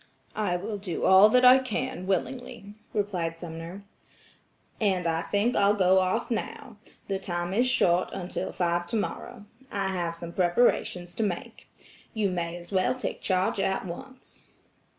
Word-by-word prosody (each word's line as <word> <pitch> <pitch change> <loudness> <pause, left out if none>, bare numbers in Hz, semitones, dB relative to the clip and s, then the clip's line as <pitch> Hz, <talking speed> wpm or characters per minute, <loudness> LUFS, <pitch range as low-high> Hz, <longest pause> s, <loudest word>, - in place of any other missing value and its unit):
"I 205 -5 0
will 205 +3 -5
do 185 -4 -3
all 190 +3 +8
that 250 +3 +4
I 255 +1 +9
can 255 -4 -3
willingly," 230 +2 -3 0.2
replied 180 -6 -2
Sumner. 170 +3 -8 1.0
"And 190 -5 +1
I 165 -1 +1
think 205 +7 0
I'll 200 +1 +4
go 190 -1 +4
off 190 +7 0
now. 230 +1 -4 0.3
The 195 -1 -1
time 175 -1 -3
is 240 +5 +3
short 180 -7 +2
until 185 -1 -4
five 175 -1 0
tomorrow. 215 +2 -4 0.3
I 195 -1 -1
have 175 -3 -2
some 170 0 -7
preparations 180 -2 +1
to 225 - -1
make. 180 -5 -4 0.5
You 205 -3 +1
may 170 -1 -3
as 175 +1 -13
well 190 +4 +2
take 255 - -5
charge 185 +1 +1
at 190 0 0
once." 260 +9 -10
190 Hz, 150 wpm, -27 LUFS, 175-215 Hz, 1.0 s, I